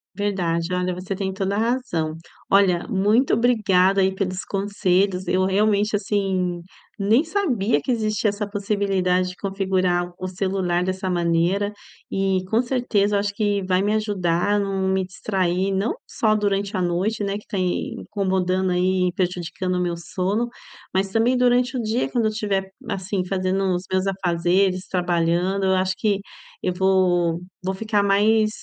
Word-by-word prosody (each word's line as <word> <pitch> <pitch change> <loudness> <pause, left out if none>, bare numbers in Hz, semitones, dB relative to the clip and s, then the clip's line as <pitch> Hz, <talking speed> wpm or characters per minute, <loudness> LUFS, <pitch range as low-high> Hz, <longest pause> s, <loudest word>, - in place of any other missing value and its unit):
Verdade. 180 -4 -1
Olha, 180 0 0
você 185 +2 -4
tem 190 0 -2
toda 195 0 -1
a - - 0
razão, 225 -10 -1 0.4
olha, 190 -2 +3
muito 215 +4 +2
obrigada 195 -5 +3
aí 190 0 +2
pelos 185 -1 -2
conselhos. 195 -2 0
Eu 185 +1 +2
realmente, 205 +2 +2
assim, 190 -4 -1 0.4
nem 220 +8 +3
sabia 280 - 0
que 260 - -2
existia 215 -2 +1
essa 205 0 -4
possibilidade 195 -3 0
de 180 - -9
configurar 185 -3 0
o 185 - -3
celular 185 -1 -1
dessa 185 +1 -3
maneira, 175 +3 +1 0.4
e 195 -1 +1
com 225 +2 +3
certeza 235 -5 +1
eu - - +3
acho 200 0 -2
que 205 -3 0
vai 185 0 +2
me 205 +1 +1
ajudar 205 -2 +1
não 195 -1 -1
me 190 0 +1
distrair, 185 0 -1
não 195 - 0 0.2
só 215 -1 +1
durante 200 -1 0
a 185 - 0
noite, 185 +5 0
né, 200 0 -1
que 210 - -12
tem 185 -3 -1
incomodando 190 -2 0
aí, 180 0 +1
prejudicando 180 0 -2
o 180 - 0
meu 175 -1 -1
sono, 190 +7 -1 0.5
mas 190 +1 0
também 235 +4 +2
durante 250 +1 +2
o - - -1
dia, 225 +3 -1
quando 235 -3 0
eu 215 - +2
tiver, 200 -3 -2 0.2
assim, 190 -1 -2
fazendo 190 +1 0
os 175 - -3
meus 185 0 +1
afazeres 185 0 +1
trabalhando, 180 +2 0
eu 190 0 +3
acho 185 0 +1
que 205 -1 +1 0.4
eu 180 - 0
vou 180 -3 +2 0.2
vou 190 +1 -2
ficar 215 +1 0
mais 215 +2 +3
195 Hz, 160 wpm, -23 LUFS, 185-205 Hz, 0.5 s, olha